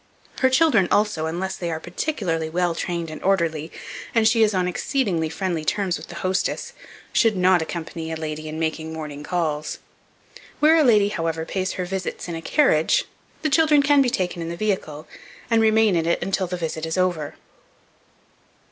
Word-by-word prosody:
Her 260 Hz, -, +4 dB
children, 260 Hz, -, +4 dB
also, 205 Hz, -7 st, +1 dB
unless 190 Hz, +4 st, -3 dB
they 175 Hz, -2 st, -4 dB
are 160 Hz, -1 st, -3 dB
particularly 175 Hz, -, -2 dB
well 175 Hz, +1 st, 0 dB
trained 170 Hz, -1 st, -3 dB
and 155 Hz, -, -8 dB
orderly, 165 Hz, -5 st, 0 dB, 0.4 s
and 225 Hz, -1 st, +4 dB
she 225 Hz, 0 st, +3 dB
is 215 Hz, -1 st, +5 dB
on 185 Hz, -3 st, 0 dB
exceedingly 180 Hz, -, -1 dB
friendly 170 Hz, -2 st, -2 dB
terms 190 Hz, +1 st, 0 dB
with -, -, -11 dB
the 175 Hz, -, -10 dB
hostess, 190 Hz, -, -1 dB, 0.4 s
should 225 Hz, -4 st, +3 dB
not 180 Hz, -1 st, +4 dB
accompany 165 Hz, 0 st, -5 dB
a -, -, -2 dB
lady 155 Hz, -1 st, -5 dB
in 155 Hz, -, -6 dB
making 160 Hz, 0 st, -2 dB
morning 150 Hz, -2 st, -6 dB
calls. 155 Hz, -2 st, -2 dB, 0.8 s
Where 310 Hz, +2 st, +6 dB
a 315 Hz, -, +5 dB
lady, 210 Hz, -6 st, +4 dB
however, 165 Hz, -4 st, -2 dB
pays 185 Hz, +1 st, -2 dB
her 180 Hz, -, -3 dB
visits 185 Hz, 0 st, -4 dB
in 170 Hz, -, -4 dB
a 165 Hz, -, -5 dB
carriage, 165 Hz, -, +3 dB, 0.4 s
the 310 Hz, -, +2 dB
children 300 Hz, -2 st, +4 dB
can 285 Hz, 0 st, +5 dB
be 260 Hz, -, +3 dB
taken 180 Hz, -5 st, -2 dB
in 165 Hz, -, -4 dB
the 170 Hz, -, -5 dB
vehicle, 165 Hz, -7 st, -2 dB, 0.4 s
and 225 Hz, -1 st, +4 dB
remain 220 Hz, -2 st, +4 dB
in 165 Hz, -1 st, 0 dB
it 170 Hz, -, +2 dB
until 190 Hz, -1 st, -1 dB
the 180 Hz, +1 st, -4 dB
visit 160 Hz, -2 st, -4 dB
is 160 Hz, -, -2 dB
over. 175 Hz, -5 st, 0 dB
180 Hz, 185 wpm, -23 LUFS, 160-210 Hz, 0.8 s, Where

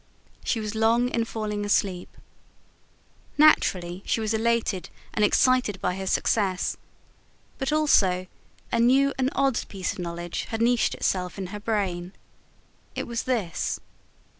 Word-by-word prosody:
She 230 Hz, -, 0 dB
was 215 Hz, -1 st, -4 dB
long 230 Hz, +3 st, +2 dB
in 230 Hz, -2 st, 0 dB
falling 210 Hz, -2 st, -3 dB
asleep. 195 Hz, -3 st, -1 dB, 1.2 s
Naturally, 185 Hz, -, +4 dB
she -, -, 0 dB
was 220 Hz, 0 st, -1 dB
elated 225 Hz, -4 st, 0 dB, 0.2 s
and 210 Hz, -, +1 dB
excited 245 Hz, -2 st, +3 dB
by 180 Hz, -, 0 dB
her 190 Hz, 0 st, -5 dB
success; 190 Hz, -2 st, +1 dB, 0.8 s
but 270 Hz, +1 st, -1 dB
also 195 Hz, -12 st, +3 dB, 0.5 s
a 235 Hz, -, +1 dB
new 270 Hz, +4 st, +4 dB
and 260 Hz, 0 st, +2 dB
odd 270 Hz, -3 st, +1 dB
piece 190 Hz, -3 st, -3 dB
of -, -, -11 dB
knowledge 175 Hz, 0 st, -4 dB
had 225 Hz, -, -4 dB
niched 235 Hz, +1 st, +2 dB
itself 180 Hz, 0 st, -1 dB
in 195 Hz, -, -4 dB
her 210 Hz, -, -5 dB
brain. 190 Hz, -4 st, -2 dB, 0.8 s
It -, -, -3 dB
was 235 Hz, -1 st, -3 dB
this. 210 Hz, -10 st, -1 dB
215 Hz, 140 wpm, -26 LUFS, 185-235 Hz, 1.2 s, Naturally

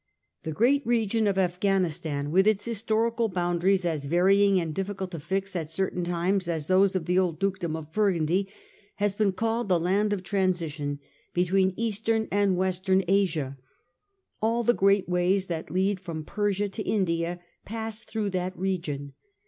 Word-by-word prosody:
The 160 Hz, -, -4 dB
great 260 Hz, -, +3 dB
region 225 Hz, -2 st, +1 dB
of 195 Hz, -1 st, +1 dB
Afghanistan, 175 Hz, -6 st, 0 dB
with 190 Hz, +4 st, +4 dB
its 215 Hz, -2 st, +2 dB
historical 230 Hz, +1 st, 0 dB
boundaries 180 Hz, +1 st, +1 dB
as 155 Hz, -4 st, -1 dB
varying 195 Hz, +5 st, +4 dB
and 165 Hz, -3 st, -3 dB
difficult 195 Hz, +1 st, -4 dB
to 165 Hz, -, -5 dB
fix 190 Hz, +4 st, -3 dB
at 160 Hz, -3 st, -3 dB
certain 180 Hz, +1 st, -2 dB
times 175 Hz, +2 st, 0 dB
as 160 Hz, -3 st, -2 dB
those 190 Hz, +2 st, +3 dB
of 180 Hz, -4 st, -1 dB
the 180 Hz, +1 st, +2 dB
old 175 Hz, -4 st, 0 dB
Dukedom 190 Hz, -3 st, -1 dB
of 160 Hz, -1 st, -8 dB
Burgundy, 190 Hz, -2 st, +1 dB, 0.5 s
has 205 Hz, -1 st, 0 dB
been 205 Hz, -1 st, +2 dB
called 225 Hz, +3 st, -1 dB
the 180 Hz, -2 st, +3 dB
land 195 Hz, +5 st, +1 dB
of 200 Hz, -3 st, -2 dB
transition 170 Hz, -7 st, -1 dB, 0.4 s
between 185 Hz, +1 st, +2 dB
Eastern 225 Hz, 0 st, 0 dB
and 200 Hz, -2 st, +2 dB
Western 190 Hz, +1 st, +1 dB
Asia. 160 Hz, -9 st, +1 dB, 0.8 s
All 230 Hz, +2 st, +1 dB
the 240 Hz, -, +4 dB
great 195 Hz, -2 st, +3 dB
ways 180 Hz, +2 st, +1 dB
that 165 Hz, -4 st, -5 dB
lead 190 Hz, +3 st, 0 dB
from 165 Hz, -4 st, -6 dB
Persia 205 Hz, +1 st, 0 dB
to 195 Hz, -, -6 dB
India 175 Hz, -4 st, -1 dB, 0.2 s
pass 225 Hz, 0 st, -5 dB
through 215 Hz, -3 st, -3 dB
that 185 Hz, 0 st, -3 dB
region. 160 Hz, -7 st, -3 dB
190 Hz, 160 wpm, -27 LUFS, 175-205 Hz, 0.8 s, with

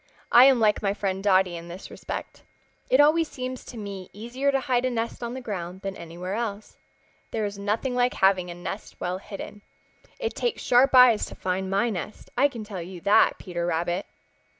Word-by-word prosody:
I 245 Hz, +2 st, +9 dB
am 265 Hz, -3 st, +6 dB
like 215 Hz, -2 st, +3 dB
my 200 Hz, -1 st, 0 dB
friend 195 Hz, -2 st, -2 dB
Dotty 190 Hz, -3 st, +3 dB
in 170 Hz, 0 st, -8 dB
this 175 Hz, +3 st, -9 dB
respect. -, -, -7 dB, 0.5 s
It 260 Hz, -, +4 dB
always 310 Hz, +2 st, +5 dB
seems 255 Hz, -2 st, -6 dB
to 240 Hz, -, -9 dB
me 200 Hz, -3 st, -7 dB
easier 240 Hz, +7 st, -1 dB
to 270 Hz, -, +2 dB
hide 250 Hz, -1 st, +1 dB
a 255 Hz, -, +1 dB
nest 230 Hz, -1 st, -3 dB
on 235 Hz, +1 st, -4 dB
the 260 Hz, -, -5 dB
ground 185 Hz, -5 st, -5 dB
than 195 Hz, 0 st, -4 dB
anywhere 175 Hz, +3 st, -6 dB
else. 215 Hz, -2 st, -4 dB, 0.5 s
There 220 Hz, -2 st, -2 dB
is 200 Hz, 0 st, -5 dB
nothing 215 Hz, +6 st, -1 dB
like 245 Hz, 0 st, +1 dB
having 190 Hz, -2 st, +3 dB
a 175 Hz, -, -6 dB
nest 180 Hz, +4 st, -7 dB
well 180 Hz, +1 st, -2 dB
hidden. 205 Hz, +1 st, -9 dB, 0.6 s
It 470 Hz, -2 st, -3 dB
takes 480 Hz, -2 st, -2 dB
sharp 255 Hz, +2 st, +4 dB
eyes 250 Hz, -4 st, +7 dB
to -, -, -10 dB
find 190 Hz, +1 st, -2 dB
my 200 Hz, +5 st, +1 dB
nest, 200 Hz, +2 st, -6 dB
I 285 Hz, -, +5 dB
can 240 Hz, -6 st, -7 dB
tell 200 Hz, -4 st, -6 dB
you 180 Hz, +1 st, -8 dB
that, 200 Hz, +3 st, +4 dB
Peter 175 Hz, -2 st, -4 dB
Rabbit." 175 Hz, +3 st, -1 dB
205 Hz, 200 wpm, -26 LUFS, 185-245 Hz, 0.6 s, I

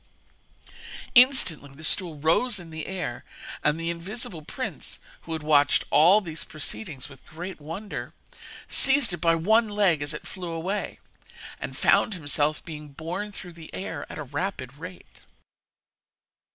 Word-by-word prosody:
Instantly 240 Hz, -, +5 dB
the 155 Hz, -, -12 dB
stool 165 Hz, -1 st, +3 dB
rose 170 Hz, -, +2 dB
in 170 Hz, -3 st, -10 dB
the 160 Hz, -1 st, -5 dB
air, 180 Hz, -10 st, -4 dB, 0.4 s
and 150 Hz, +2 st, +2 dB
the 165 Hz, 0 st, -1 dB
invisible 175 Hz, 0 st, -5 dB
prince, 150 Hz, -, -5 dB, 0.3 s
who 165 Hz, -, -4 dB
had 160 Hz, -1 st, -4 dB
watched 145 Hz, -2 st, +4 dB
all 180 Hz, +8 st, +7 dB
these 165 Hz, -4 st, -6 dB
proceedings 155 Hz, -2 st, -4 dB
with 140 Hz, -2 st, -15 dB
great 175 Hz, +1 st, -7 dB
wonder, 180 Hz, +8 st, -6 dB, 0.6 s
seized 270 Hz, -7 st, +5 dB
it -, -, -2 dB
by 165 Hz, -1 st, +4 dB
one 220 Hz, +7 st, +3 dB
leg 200 Hz, -7 st, +3 dB
as 145 Hz, +1 st, -3 dB
it 150 Hz, -, -7 dB
flew 180 Hz, -2 st, -6 dB
away, 175 Hz, +5 st, -3 dB, 0.6 s
and -, -, -5 dB
found 215 Hz, -, +4 dB
himself 150 Hz, -2 st, 0 dB
being 150 Hz, -2 st, -7 dB
borne 170 Hz, +8 st, -5 dB
through 180 Hz, -3 st, -9 dB
the 165 Hz, -1 st, -12 dB
air 165 Hz, -6 st, -5 dB
at -, -, -7 dB
a 150 Hz, -, -4 dB
rapid 140 Hz, -3 st, -4 dB
rate. 180 Hz, +3 st, -11 dB
165 Hz, 150 wpm, -26 LUFS, 155-195 Hz, 0.6 s, all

